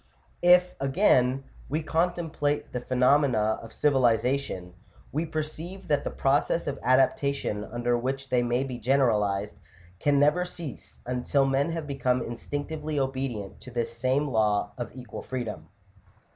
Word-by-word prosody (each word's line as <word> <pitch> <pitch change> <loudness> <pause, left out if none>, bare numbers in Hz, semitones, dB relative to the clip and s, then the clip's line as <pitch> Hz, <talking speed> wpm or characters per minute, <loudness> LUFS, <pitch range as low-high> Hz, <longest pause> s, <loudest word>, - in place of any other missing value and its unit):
V.). 175 - +1
If, 180 0 +4
again, 135 -3 +3 0.3
we 155 +3 -1
contemplate 160 -3 -1
the 125 - -1
phe 130 +1 -4
nomena 125 -4 +3
of 115 - -10
civilization, 125 -8 +1 0.4
we 160 +4 -1
perceive 160 +4 -5
that 145 -1 +2
the - - -2
process 145 +4 +1
of 140 -1 -3
adapta 130 +2 +3
tion 105 -6 -3
under 120 +3 -1
which 135 +3 -3
they 125 -1 +3
may 120 +2 +1
be 130 -3 -5
generalized, 105 -5 +1 0.4
can 145 -1 +3
never 150 +5 +4
cease 170 -6 -8
until 125 +3 +1
men 135 +4 +1
have 165 -2 -3
become 130 -3 0
instinctively 145 +5 -4
obedient 130 -6 -3
to - - -10
this 120 -1 -3
same 130 +5 +1
law 105 -4 +1
of 120 -3 -5
equal 125 -4 -8
freedom 120 -4 -5
(Chap. 100 -1 -32
135 Hz, 150 wpm, -27 LUFS, 120-145 Hz, 0.4 s, If